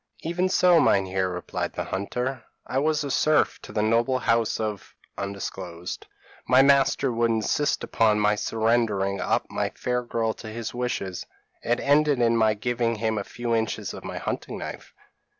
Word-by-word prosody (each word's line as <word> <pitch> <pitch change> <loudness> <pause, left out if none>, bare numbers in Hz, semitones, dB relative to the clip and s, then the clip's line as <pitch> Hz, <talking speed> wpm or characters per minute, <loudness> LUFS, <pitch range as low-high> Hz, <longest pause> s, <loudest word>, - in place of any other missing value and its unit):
p> 160 - -3
"'Even 180 +2 0
so, 180 -2 +5
Meinheer,' 95 -1 +2
replied 90 0 -4
the - - -3
hunter. 125 +6 -3 0.2
'I 130 - -1
was 155 +1 +1
a 140 - -3
serf 155 +4 +2
to - - -10
the 105 - 0
noble 115 +4 +2
house 115 -3 +1
of; 105 -3 -4 1.5
my 130 +1 +6
master 140 -1 +3
would 115 0 +1
insist 115 +6 0
upon 110 -2 +2
my 105 0 +3
surrendering 110 -3 0
up - - +1
my - - -1
fair 125 0 -1
girl 115 -2 -1
to 110 - -11
his 115 +1 -5
wishes: 120 -7 -3 0.3
it 120 +1 0
ended 145 0 +3
in 115 -1 +3
my 110 -1 +3
giving 120 +1 -1
him 110 0 -1
a - - -3
few 120 +3 -4
inches 110 -1 -1
of - - -9
my - - -6
hunting - - -4
knife.' - - -7
115 Hz, 170 wpm, -25 LUFS, 110-130 Hz, 1.5 s, my